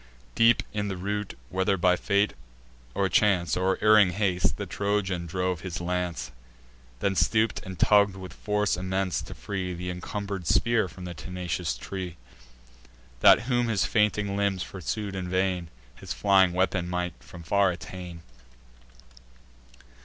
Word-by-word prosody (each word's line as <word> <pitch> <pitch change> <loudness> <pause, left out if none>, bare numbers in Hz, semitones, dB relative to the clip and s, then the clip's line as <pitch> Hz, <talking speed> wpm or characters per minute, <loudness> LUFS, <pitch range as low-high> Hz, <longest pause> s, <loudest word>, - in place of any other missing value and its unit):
Deep 115 0 +4
in 105 -1 -1
the 95 -2 -4
root, 105 +2 -3
whether 95 +1 +1
by 90 0 +4
fate, 100 +3 +1 0.6
or 100 - +2
chance, 90 -2 +2
Or 95 +1 +1
erring 105 -4 +6
haste, 95 -2 0
the - - -4
Trojan 100 -4 -1
drove 90 -1 -2
his 90 -3 -5
lance; 90 -4 -3 0.7
Then 100 - +1
stoop'd, 110 +3 +2
and 95 -1 -8
tugg'd 100 +2 +4
with 95 -1 -9
force 105 -1 0
immense, 95 +1 -1
to - - -9
free 95 -3 -4
Th' 90 +1 -4
incumber'd 95 0 -5
spear 115 +5 +2
from 90 +2 -10
the 90 - -5
tenacious 90 -5 -4
tree; 90 +3 -6 1.0
That, - - +7
whom 120 -1 0
his 105 -4 +1
fainting 105 -1 +1
limbs 100 -2 0
pursued 100 +2 -4
in 90 -1 -4
vain, 95 -2 0 0.2
His - - -6
flying 95 -3 +4
weapon 90 -1 0
might 90 0 -2
from 85 -2 -11
far 100 +3 +3
attain. 90 -1 -7
95 Hz, 145 wpm, -27 LUFS, 90-100 Hz, 1.0 s, That